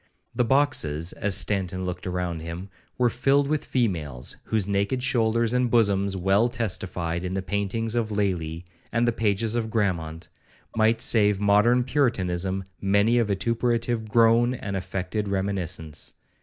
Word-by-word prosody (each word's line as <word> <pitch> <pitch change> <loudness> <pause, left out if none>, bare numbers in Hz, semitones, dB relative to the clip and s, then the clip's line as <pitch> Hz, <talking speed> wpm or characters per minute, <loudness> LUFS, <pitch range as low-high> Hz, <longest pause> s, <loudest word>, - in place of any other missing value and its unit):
The - - +1
boxes, 110 - +1
as 100 -2 +1
Stanton 95 -2 -1
looked 90 +1 -5
round 90 -2 -3
him, 85 +4 -7 0.3
were 125 -2 +2
filled 140 +4 +2
with 150 0 0
females, 80 - -2
whose 110 -4 0
naked 100 +6 0
shoulders 115 -2 +1
and 125 -1 +2
bosoms, 100 -4 +2
well 95 +6 +2
testified 90 -7 -2
in 90 +1 -3
the 95 - -2
paintings 105 +3 -2
of 115 -2 0
Lely, 90 -5 -2 0.3
and 120 +1 +1
the - - +4
pages 110 0 0
of 115 -2 -1
Grammont, 85 -7 -2 0.5
might 110 +1 +2
save 105 -3 +4
modern 105 +5 +4
puritanism 95 -9 0 0.2
many 100 +4 +3
a - - +4
vituperative 115 +2 -1
groan 115 +2 +4
and 100 -5 -5
affected 95 +3 -3
reminiscence. 95 -5 -2
100 Hz, 140 wpm, -25 LUFS, 95-115 Hz, 0.5 s, the